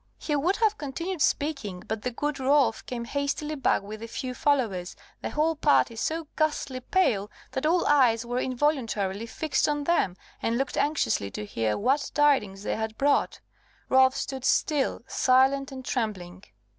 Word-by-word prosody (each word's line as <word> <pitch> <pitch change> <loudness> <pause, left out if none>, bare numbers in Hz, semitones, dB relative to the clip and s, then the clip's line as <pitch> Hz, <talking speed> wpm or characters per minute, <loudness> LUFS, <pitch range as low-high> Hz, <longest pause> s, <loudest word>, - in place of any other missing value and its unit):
He 300 - -2
would 340 +7 +1
have 435 -2 +1
continued 330 +5 -4
speaking, 275 -14 -1
but 220 0 -3
the 250 - -2
good 290 +4 -3
Rolf 270 -3 +2
came 235 -2 -4
hastily 285 +3 -2
back 270 -8 +1
with 215 +2 -8
a 230 - -6
few 255 +2 -5
followers, 230 -11 0 0.3
the - - -3
whole 320 +2 +1
party 290 -5 +3
so 320 +8 -2
ghastly 295 -4 -1
pale, 240 - +1 0.2
that 265 +3 -1
all 345 +2 +2
eyes 245 -5 +4
were 245 +1 -2
involuntarily 235 -7 -1
fixed 300 +3 0
on 295 -1 -1
them, 280 - +1 0.2
and 230 +1 0
looked 270 +2 -2
anxiously 290 - 0
to 105 +2 -6
hear 110 0 -1
what 270 +7 +1
tidings 265 -10 +2
they - - -2
had 220 0 -4
brought. 285 +1 +1 0.5
Rolf 260 0 +5
stood 265 -2 -4
still, 290 +1 +1
silent 270 +2 +3
and 260 -1 -8
trembling. 190 -6 -3
265 Hz, 165 wpm, -27 LUFS, 225-295 Hz, 0.5 s, Rolf